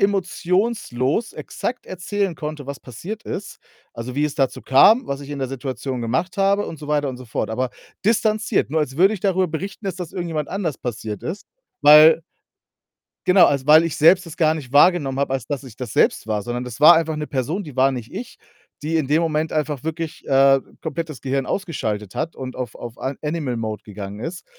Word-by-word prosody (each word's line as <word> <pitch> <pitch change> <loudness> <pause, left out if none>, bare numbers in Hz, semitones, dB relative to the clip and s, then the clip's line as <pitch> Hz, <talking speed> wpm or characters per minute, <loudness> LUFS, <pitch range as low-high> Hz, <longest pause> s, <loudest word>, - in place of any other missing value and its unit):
emotionslos 190 - 0
exakt 245 0 -5
erzählen 185 0 -3
konnte, 150 -2 -6
was 140 -2 -5
passiert 175 - -8
ist, 200 - -6 0.3
also, 120 +2 -6
wie 145 +1 +1
es 150 - -2
dazu 135 -3 0
kam, 210 - +5
was 140 0 -3
ich 140 - -9
in 145 - -4
der 130 - -1
Situation 130 -1 -4
gemacht 130 - -1
habe 200 +1 +2
und 160 - -7
so 150 - -9
weiter 145 -1 +1
und 130 - -5
so 125 - -11
fort, 115 - -3
aber 125 +3 -1 0.3
distanziert, 215 - +1
nur 160 - +1
als 135 -3 -3
würde 190 +6 +5
ich 195 - -7
darüber 190 -2 +1
berichten, 195 +7 -6
dass 190 -3 -3
das 180 -3 -6
irgendjemand 165 -5 -3
anders 180 -8 -3
passiert 110 -4 -5
ist. 185 +5 -5 0.4
Weil 155 +3 +8 1.0
genau, 185 0 +7
also, 140 -2 0
weil 155 +2 +7
ich 165 - -2
selbst 175 +4 +5
das 165 - -9
gar 155 -1 +3
nicht 135 -6 -8
wahrgenommen 145 -3 +4
habe, 140 - 0
als 130 -4 -3
dass 145 -2 -3
ich 120 -5 -12
das 125 -3 -6
selbst - - +2
war, 105 -2 -1
sondern 120 +3 -4
das 125 +1 -8
war 155 +3 +9
einfach 160 -1 0
'ne 150 0 -3
Person, 150 - -2
die 145 -6 -11
war 135 +1 +4
nicht 120 -3 -7
ich 245 - -7 0.5
die 165 +1 0
in 155 -4 0
dem 155 +4 +2
Moment 155 -1 -1
einfach 150 -2 -2
wirklich, 160 0 -5
äh, 135 0 +5 0.2
komplett 165 0 -4
das 150 -6 -9
Gehirn 135 0 -1
ausgeschaltet 110 - -3
hat 165 - -2
und 130 -1 -7
auf 125 -4 -5
auf 120 -1 -9
an 135 +1 -3
Animal 150 -5 -2
Mode 110 -2 -4
gegangen 100 -1 -8
ist 165 +10 -6
150 Hz, 210 wpm, -21 LUFS, 130-175 Hz, 1.0 s, war